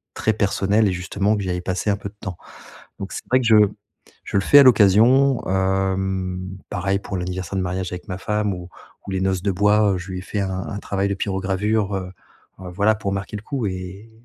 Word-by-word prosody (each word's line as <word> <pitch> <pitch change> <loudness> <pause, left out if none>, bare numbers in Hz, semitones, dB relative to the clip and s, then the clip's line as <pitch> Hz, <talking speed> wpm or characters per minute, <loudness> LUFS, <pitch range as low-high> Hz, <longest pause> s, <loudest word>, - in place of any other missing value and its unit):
très 110 - +1
personnel 105 +1 +1
et - - +1
justement 100 +3 0
que 100 - -3
j'y 95 - -3
avais 90 0 -2
passé 90 +3 -2
un 100 - 0
peu 100 - -7
de 100 - -23
temps. 95 -5 -6 0.6
Donc 100 - -6
c'est - - -5
vrai 130 - +5
que 125 - -3
je 110 - +6 0.7
je - - -2
le - - +3
fais 145 - +7
à - - +9
l'occasion, 120 +3 +5
hem, 95 -1 -1
pareil 100 0 -1
pour 100 -1 -5
l'anniversaire 90 +1 -4
de 95 - 0
mariage 90 +1 -3
avec 90 -1 -7
ma 95 -1 -5
femme 105 0 -1
ou 90 -1 -8 0.4
ou - - -4
les 95 -1 -1
noces 95 -1 0
de 100 - -1
bois, 105 +1 +3
je 90 +2 -8
lui 90 - -4
ai - - -7
fait 100 +2 -3
un 95 -1 -2
un 100 - -5
travail 100 -1 -1
de 100 - -1
pyrogravure, 100 +2 -1
heu, 95 -1 -4 0.5
heu, 90 - -7
voilà, 100 +4 +2
pour 100 -2 -3
marquer 100 +1 -4
le - - -9
coup 125 +1 -3
et 95 +3 -7
95 Hz, 225 wpm, -22 LUFS, 95-105 Hz, 0.7 s, à